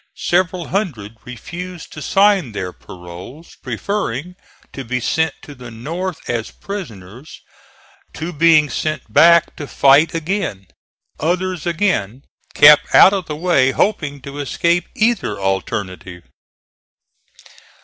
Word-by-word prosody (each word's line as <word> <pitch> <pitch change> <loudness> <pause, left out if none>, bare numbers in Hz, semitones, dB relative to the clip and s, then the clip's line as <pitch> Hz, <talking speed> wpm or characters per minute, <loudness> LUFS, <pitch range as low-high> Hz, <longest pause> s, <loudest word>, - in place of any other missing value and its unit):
Several 175 -1 0
hundred 135 - -3
refused 175 +8 -9
to 155 - -9
sign 195 - +2
their 90 -3 -5
paroles, 90 - -12
preferring 180 - -3 0.4
to 135 - -6
be 125 +1 -3
sent 160 +5 0
to 145 - -11
the 125 -3 -11
North 165 +10 -6
as 115 -2 -3
prisoners 125 - -9 0.7
to 170 +3 -5
being 155 -1 +4
sent 155 -8 -4
back 170 +4 +5
to 145 - -6
fight 140 +5 +4
again. 165 - -3 0.5
Others 180 +1 -2
again 155 - -1 0.3
kept 150 0 +6
out 195 - +8
of 190 -4 -3
the 150 - -4
way, 155 -5 +2
hoping 145 -8 -1
to 140 +2 -9
escape 170 +4 0
either 230 - 0
alternative. 95 -2 -4
155 Hz, 120 wpm, -18 LUFS, 120-180 Hz, 0.7 s, out